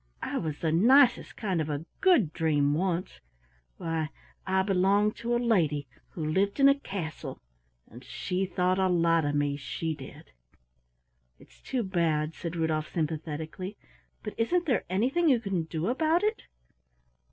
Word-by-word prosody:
I - - -2
was 155 -3 -3
the 160 - -1
nicest 245 - +4
kind 190 -6 -1
of 155 - -3
a 150 +2 -3
Good 300 - +4
Dream 145 -3 +2
once 180 +2 -2 0.6
why 160 -2 -2 0.4
I 190 0 +2
belonged 200 +2 +2
to 235 +1 -1
a - - +3
lady 170 -12 +1 0.2
who 160 - -5
lived 195 - 0
in 275 - +7
a 275 0 +4
castle, 180 - -6 0.5
and 120 +4 -13
she 185 +6 -3
thought 185 0 +1
a 190 -1 +3
lot 165 -2 +3
of 145 0 0
me, 145 -1 0
she 160 +3 -3
did!" 140 -3 -12 1.1
"It's - - -20
too 255 -3 -2
bad," 165 -5 0
said 170 0 -6
Rudolf 160 -2 -1
sympathetically; 160 +4 -4 0.5
"but - - -5
isn't 350 +10 +1
there 250 - +1
anything 260 - +2
you 255 -4 +4
can 195 -7 -2
do 160 0 -3
about 315 - +2
it?" 430 +1 -1
180 Hz, 155 wpm, -28 LUFS, 155-220 Hz, 1.1 s, in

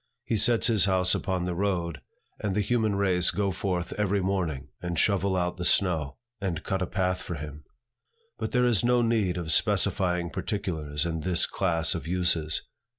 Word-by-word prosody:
He - - -1
sets 115 +2 +3
his 110 -6 +4
house 95 -2 +3
upon 90 -2 -1
the 90 - -2
road, 85 -3 -2 0.4
and 100 -2 -2
the 105 - +2
human 110 -1 0
race 95 -3 +3
go 100 -1 0
forth 90 0 -3
every 100 -1 +1
morning, 90 -8 -2
and 85 -1 -4
shovel 100 +1 +2
out 90 -1 -1
the 90 - -4
snow, 80 -6 +1 0.2
and 95 -6 -3
cut 95 -2 -2
a 95 - -1
path 90 -1 -1
for 85 - -5
him. 75 0 -8 0.7
But - - -3
there 125 -2 +2
is 120 -4 +2
no 120 0 +3
need 110 -6 +1
of 85 -2 -3
specifying 90 -1 +1
particulars 80 -8 -3
in 80 -1 -2
this 90 +1 +3
class 85 -5 +1
of - - -5
uses. 85 -3 +1
90 Hz, 180 wpm, -27 LUFS, 85-100 Hz, 0.7 s, his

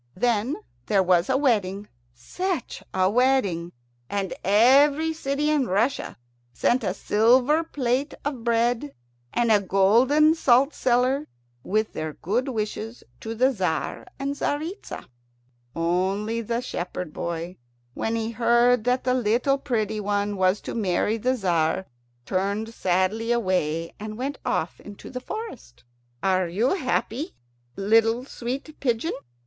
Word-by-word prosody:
Then 235 +5 +1 0.3
there 195 -2 +3
was 180 +1 +3
a 260 - +3
wedding 205 -7 0 0.3
such 355 - -4
a 185 0 +2
wedding! 205 -7 +2 0.4
and 200 -2 -2
every 280 - +5
city 295 0 -1
in 285 -5 +2
Russia 225 +9 0 0.4
sent 240 - +1
a - - -1
silver 250 +9 +3
plate 270 -2 -1
of 270 -5 -3
bread, 230 - +1 0.4
and 235 -1 +1
a 210 -2 +5
golden 235 - +4
salt 275 -2 +3
cellar, 255 +4 +1 0.4
with 215 +2 0
their 155 -1 -4
good 230 - -1
wishes 220 -1 -4 0.2
to 225 +1 -5
the 255 +4 +3
Tzar 185 -7 -2
and 275 +1 -2
Tzaritza. 310 +7 -4 0.7
Only 190 +7 0
the 230 +2 -2
shepherd 180 -7 -5
boy, 170 +1 -4 0.4
when 225 - -2
he 225 0 -2
heard 235 0 +3
that 250 +1 +1
the 255 - +2
little 250 +3 +1
pretty 220 -5 -1
one 205 0 -1
was 185 +1 +2
to - - -6
marry 210 +1 0
the 255 +4 +1
Tzar, 180 -3 0 0.4
turned 200 +4 -1
sadly 190 +5 0
away 180 -8 0
and 215 +1 -6
went 275 +3 -4
off - - -2
into 205 -1 -11
the 250 -1 -5
forest. 425 - -8 0.4
"Are 185 -2 +2
you 210 +9 +1
happy, 285 - -2 0.4
little 225 +4 +2
sweet 270 +4 -6
pigeon?" 245 +4 0
230 Hz, 130 wpm, -25 LUFS, 195-260 Hz, 0.7 s, every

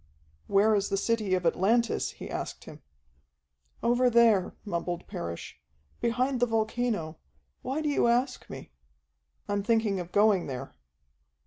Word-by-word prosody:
"Where 205 +2 +4
is 200 -1 +1
the 195 - 0
city 215 -2 +1
of 180 -1 -3
Atlantis?" 225 +7 +1
he - - -9
asked - - -5
him. - - -11 1.0
"Over 245 +1 +3
there," 230 -5 +4
mumbled 175 -2 -3
Parrish. 85 -5 -7 0.4
"Behind 250 +3 0
the 245 - +3
volcano. 220 -7 -1 0.4
Why 280 +4 -3
do 300 - 0
you 280 - +2
ask 250 +2 0
me?" - - -9 0.8
"I'm 205 0 0
thinking 220 -2 +1
of 175 0 -7
going 205 -3 +3
there." 130 -2 -6
220 Hz, 135 wpm, -28 LUFS, 190-240 Hz, 1.0 s, Where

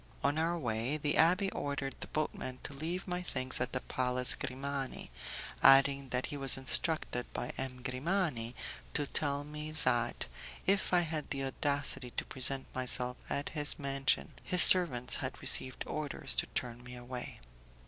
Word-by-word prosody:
On 145 +2 +1
our 170 +2 0
way, 120 0 -2
the 145 -1 -1
abbé 185 +4 +3
ordered 140 -1 -4
the - - -6
boatman 130 -4 -4
to - - -7
leave 170 +7 -5
my 180 0 -3
things 130 -7 -3
at - - -2
the 130 - -3
Palace 125 0 +3
Grimani, 135 - -5 0.5
adding 135 0 +5
that 125 0 -2
he 145 - -6
was 135 -2 +2
instructed 130 -1 +1
by 120 - -4
M. 130 -1 -6
Grimani 130 -3 -2 0.4
to 145 - +1
tell 140 0 -1
me 150 +1 -7
that, 120 -6 -1 0.4
if 195 0 +1
I 180 -1 +4
had 155 -3 -4
the 135 -1 -3
audacity 140 -1 -1
to - - -1
present 135 +1 +2
myself 125 -1 -2
at 140 - -2
his 150 -2 +1
mansion, 140 0 -1
his 180 -2 +8
servants 140 -10 +7
had 135 -2 -5
received 130 -1 0
orders 150 -2 -4
to - - +2
turn 120 0 -4
me 125 0 -10
away. 125 0 -8
140 Hz, 160 wpm, -32 LUFS, 125-155 Hz, 0.5 s, his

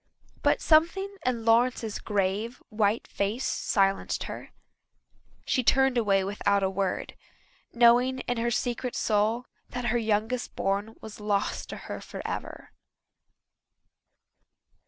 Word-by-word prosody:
But - - +2
something 345 +5 +3
in 235 -3 -1
Lawrence's 230 -1 +2
grave, 205 +4 -1
white 215 0 +1
face 205 +6 -2
silenced 195 -1 0
her. - - -7 1.0
She 255 - +1
turned 265 +2 +4
away 200 -5 +2
without 200 0 +1
a 190 - +1
word, 195 -1 -2 0.6
knowing 245 +2 +4
in 245 - -2
her 235 +1 0
secret 240 +2 -2
soul 220 +3 +1 0.2
that 245 0 -4
her 240 - +2
youngest 225 +3 -1
born 200 +3 -1
was 220 -1 -10
lost 205 -1 -1
to - - -6
her - - -6
forever. - - -6
225 Hz, 115 wpm, -27 LUFS, 205-245 Hz, 1.0 s, turned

